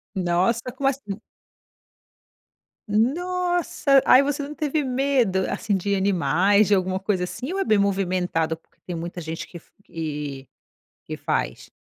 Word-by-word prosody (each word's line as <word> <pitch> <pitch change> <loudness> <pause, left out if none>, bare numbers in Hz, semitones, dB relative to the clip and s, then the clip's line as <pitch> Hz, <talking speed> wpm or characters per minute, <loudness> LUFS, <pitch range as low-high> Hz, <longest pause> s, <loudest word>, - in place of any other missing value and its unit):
Nossa. 185 +6 +1
Como 275 0 0
assim? 225 -6 -5 1.7
Nossa! 340 - +2
Aí, 260 +2 +7
você 285 +1 -1
não 295 +2 -6
teve 305 -1 0
medo, 255 -7 +1
assim, 210 -3 -1
de 200 +2 -1
animais, 195 +2 +3
de 205 - +5
alguma 185 0 0
coisa 190 -3 0
assim? 260 - -6
Ou 390 - -2
é 385 - 0
bem 215 - +4
movimentado 185 -5 0
porque 165 - -31
tem 175 - -4
muita 170 +2 -5
gente 160 0 -5
que 175 - -11
f - - -18
que 145 -4 -5 0.6
que - - -5
faz? 60 - -2
200 Hz, 145 wpm, -24 LUFS, 175-270 Hz, 1.7 s, Aí